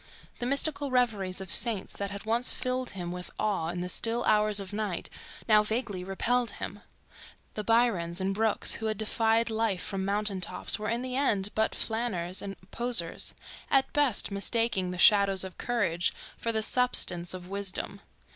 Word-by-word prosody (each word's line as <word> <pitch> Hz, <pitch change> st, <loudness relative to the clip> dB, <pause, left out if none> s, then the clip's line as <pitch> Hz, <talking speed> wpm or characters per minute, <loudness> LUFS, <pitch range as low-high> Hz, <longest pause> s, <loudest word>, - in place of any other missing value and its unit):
The 240 Hz, -, -2 dB
mystical 280 Hz, +1 st, 0 dB
reveries 210 Hz, -8 st, 0 dB
of 190 Hz, -3 st, -4 dB
saints 225 Hz, -5 st, +2 dB
that 200 Hz, 0 st, -3 dB
had 200 Hz, +1 st, -7 dB
once 235 Hz, +3 st, +2 dB
filled 255 Hz, 0 st, -2 dB
him 175 Hz, -1 st, -4 dB
with 180 Hz, 0 st, -7 dB
awe 200 Hz, -6 st, -1 dB
in 175 Hz, +1 st, -3 dB
the 180 Hz, -, -3 dB
still 230 Hz, +5 st, +1 dB
hours 210 Hz, -1 st, +3 dB
of 195 Hz, 0 st, -6 dB
night, 205 Hz, -4 st, -2 dB, 0.4 s
now 215 Hz, -2 st, +6 dB
vaguely 210 Hz, -3 st, -2 dB
repelled 235 Hz, +6 st, 0 dB
him. -, -, -6 dB, 0.7 s
The 210 Hz, -, -4 dB
Byrons 205 Hz, -7 st, +2 dB
and 190 Hz, +1 st, -1 dB
Brookes 220 Hz, +1 st, 0 dB
who 220 Hz, -, -1 dB
had 215 Hz, -1 st, -2 dB
defied 225 Hz, +1 st, +1 dB
life 220 Hz, -4 st, 0 dB
from 195 Hz, -1 st, -3 dB
mountain 200 Hz, -1 st, -1 dB
tops 180 Hz, +4 st, -1 dB
were 215 Hz, 0 st, -3 dB
in 235 Hz, +2 st, -1 dB
the 255 Hz, 0 st, -4 dB
end 210 Hz, -8 st, +1 dB
but 220 Hz, 0 st, 0 dB
flaneurs 195 Hz, -6 st, -1 dB
and 195 Hz, -1 st, -6 dB, 0.2 s
poseurs, 235 Hz, -9 st, +2 dB, 0.3 s
at 270 Hz, -1 st, +2 dB
best 280 Hz, -9 st, +2 dB
mistaking 200 Hz, -1 st, 0 dB
the 180 Hz, -, -5 dB
shadow 200 Hz, +1 st, +6 dB
of 190 Hz, -1 st, -8 dB
courage 205 Hz, -8 st, 0 dB, 0.2 s
for 230 Hz, -, -2 dB
the 220 Hz, -1 st, 0 dB
substance 185 Hz, -9 st, +3 dB
of 180 Hz, -1 st, -9 dB
wisdom. 200 Hz, 0 st, -4 dB
210 Hz, 175 wpm, -28 LUFS, 190-235 Hz, 0.7 s, now